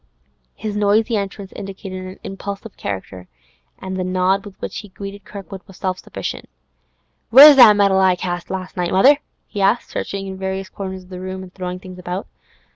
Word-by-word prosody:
His 215 -2 -5
noisy 210 +3 +2
entrance 200 -1 -4
indicated 190 -1 -7
an 185 0 -9
impulsive 200 +2 -7
character, 95 -2 -6 0.5
and 190 0 -6
the 185 - -1
nod 185 +2 +1
with 200 -2 -12
which - - -5
he 205 - -11
greeted 200 +1 -9
Kirkwood 195 -1 -9
was 190 -2 -14
self 185 -1 -2
sufficient. - - -6 0.8
'Where's 280 +4 +10
that 220 -5 +9
medal 200 -2 +4
I 190 -1 +4
cast 175 -1 -4
last 185 -1 -5
night, 175 -1 -1
mother?' 270 +11 +5 0.3
he 205 - -5
asked, 205 +5 +2
searching 195 0 -4
in 190 -1 -7
various 190 0 -3
corners 190 -1 -6
of 180 - -20
the 180 -1 -7
room 185 0 -5
and 185 -1 -13
throwing 180 -1 -5
things 185 -1 -11
about. 180 +2 -4
190 Hz, 185 wpm, -20 LUFS, 185-200 Hz, 0.8 s, Where's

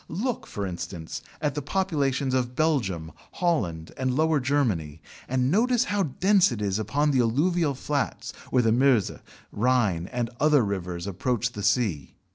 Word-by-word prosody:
Look, 225 +9 -3
for 100 - -4
instance, 85 -2 -6 0.2
at 150 -2 0
the 150 - -3
population 140 -6 0
of 125 -1 -1
Belgium, 115 - 0 0.2
Holland, 95 - -1
and 130 -1 -1
Lower 160 0 +2
Germany, 115 - 0 0.3
and 130 +1 +1
notice 240 +5 +3
how 205 -4 -1
dense 185 +3 +3
it 120 - -4
is 100 -1 -1
upon 145 +8 +1
the 135 - +2
alluvial 145 +6 +1
flats 145 +2 -2 0.2
where 125 -1 +3
the 115 - +3
Meuse, 125 -4 +3 0.4
Rhine, 105 -7 +1
and 120 0 -3
other 150 -4 +4
rivers 90 -3 -4
approach 120 +5 -1
the 105 - -7
sea. 100 - 0
125 Hz, 155 wpm, -26 LUFS, 100-150 Hz, 0.4 s, other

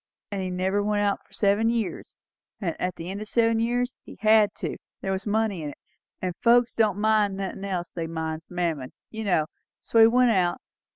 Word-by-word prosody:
An' 200 -1 -2
he 185 - -2
never 190 +2 0
went 205 0 +1
out 200 -1 +1
for - - -33
seven 205 +2 +2
years; 230 -4 -3 0.4
and 170 -6 -2
at 180 -1 -1
the 170 +3 -6
end 200 +2 -5
o' - - -2
seven 225 +1 +2
years 245 +2 0
he - - -12
had 215 -1 +5
to - - -4 0.2
there 195 - -2
was 190 +2 -3
money 210 -4 0
in 150 - -4
it 145 - -10 0.5
and 180 -1 -1
folks 240 0 +4
that 225 - +3
won't 200 -2 -4
mind 210 -2 +2
nothin' 195 0 -4
else, 185 -3 -3
they 165 -2 -4
minds 160 0 -4
Mammon, 165 -7 -2 0.2
you 220 0 -5
know; 180 -7 +2 0.3
so 230 - +1
he 225 - +9
went 245 +1 +4
out. 180 -4 +1
200 Hz, 215 wpm, -26 LUFS, 180-220 Hz, 0.5 s, he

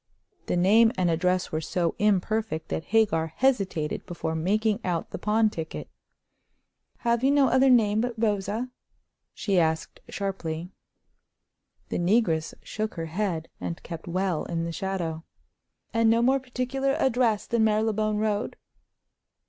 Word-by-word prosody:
The - - 0
name 220 +6 +5
and 180 -2 +2
address 180 +2 0
were 155 - -1
so 170 +1 -1
imperfect 210 -3 0
that 160 - -3
Hagar 200 -8 +2
hesitated 195 - 0
before 170 -2 -3
making 205 +6 +1
out 175 -3 -2
the - - -5
pawn 215 +2 +2
ticket. 160 -4 -6 1.1
"Have 235 0 +1
you 270 - +4
no 280 -2 +4
other 260 +1 +4
name 220 -4 +4
but 245 0 -2
Rosa?" 215 +2 -1 0.6
she 195 -3 +1
asked, 160 -1 -1
sharply. 180 -3 -4 1.2
The - - -2
negress 175 -4 +1
shook 215 0 -4
her 165 -2 -3
head, 175 -5 -1
and 170 - -5
kept 165 0 -8
well 185 -1 -1
in 165 -1 -2
the 170 - -3
shadow. 170 -3 -3 0.7
"And 230 -1 +3
no 230 +1 +3
more 265 +2 +4
particular 260 +1 -2
address 240 -6 +1
than 235 -1 +1
Marylebone 215 0 +1
Road?" 210 -1 -1
205 Hz, 140 wpm, -26 LUFS, 170-225 Hz, 1.2 s, name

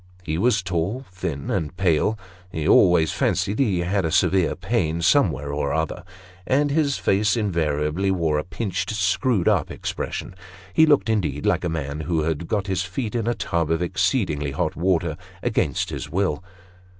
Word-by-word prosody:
He 80 -1 -2
was 110 -2 +2
tall, 95 +9 -2
thin, 90 - -4
and 90 -5 -2
pale; 95 +3 +2 0.3
he 80 -4 -3
always 80 -3 +5
fancied 100 +3 0
he 100 -10 +2
had 95 +3 0
a 80 - 0
severe 90 -1 +2
pain 90 -5 -1
somewhere 80 - +2
or 70 -1 -1
other, 80 +2 -2 0.4
and 145 +2 +2
his 145 -2 +1
face 105 +2 +2
invariably 85 -3 0
wore 80 -5 +1
a - - -3
pinched, 95 0 -3
screwed 100 +2 +1
up - - +2
expression; 100 - -5 0.4
he 160 - +5
looked, 145 -5 +4
indeed, 105 -6 -1
like - - +2
a 90 - 0
man 75 -2 -3
who 80 0 0
had 80 +1 -2
got 105 -3 -1
his 95 -2 -1
feet 100 +5 -4
in 115 -2 -1
a 120 - +1
tub 85 -2 -1
of 80 +1 +1
exceedingly 90 - 0
hot 80 +2 -1
water, 85 -3 0 0.3
against - - 0
his - - -5
will. 95 0 -1
90 Hz, 170 wpm, -23 LUFS, 80-105 Hz, 0.4 s, always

